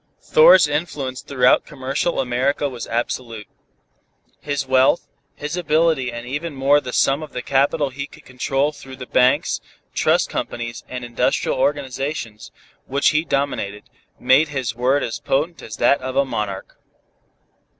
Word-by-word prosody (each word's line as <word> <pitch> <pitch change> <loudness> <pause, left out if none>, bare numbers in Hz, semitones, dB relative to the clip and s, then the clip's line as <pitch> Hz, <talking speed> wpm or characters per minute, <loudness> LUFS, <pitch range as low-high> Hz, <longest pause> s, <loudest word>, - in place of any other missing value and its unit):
Thor's - - +6
influence 145 -4 -3
throughout 125 -2 +3
commercial 140 +3 -2
America 130 +3 0
was 125 -4 -7
absolute. 115 -2 -3 0.9
His 145 -2 -3
wealth, 130 +5 +3 0.3
his 150 +3 -5
ability 155 -6 +1
and 120 0 -7
even 145 +4 -4
more 140 +2 +3
the 125 - -6
sum 135 +4 +2
of 155 - -9
the 125 - -4
capital 140 +1 +1
he 140 +2 -5
could - - -17
control 135 +3 -1
through 135 -3 -11
the 130 - -8
banks, 125 0 +2 0.3
trust - - +2
companies 115 0 -5
and 125 -1 -5
industrial 120 -1 0
organizations, 135 -5 -2 0.4
which 140 +2 +2
he 150 +1 +1
dominated, 135 -9 -2 0.4
made 130 +5 +4
his 130 -6 -3
word 130 +4 +1
as 115 - -4
potent 155 +5 -1
as 110 - -8
that 140 +3 +3
of 130 0 -5
a 140 - +3
monarch. 100 -6 -5
135 Hz, 145 wpm, -21 LUFS, 125-145 Hz, 0.9 s, Thor's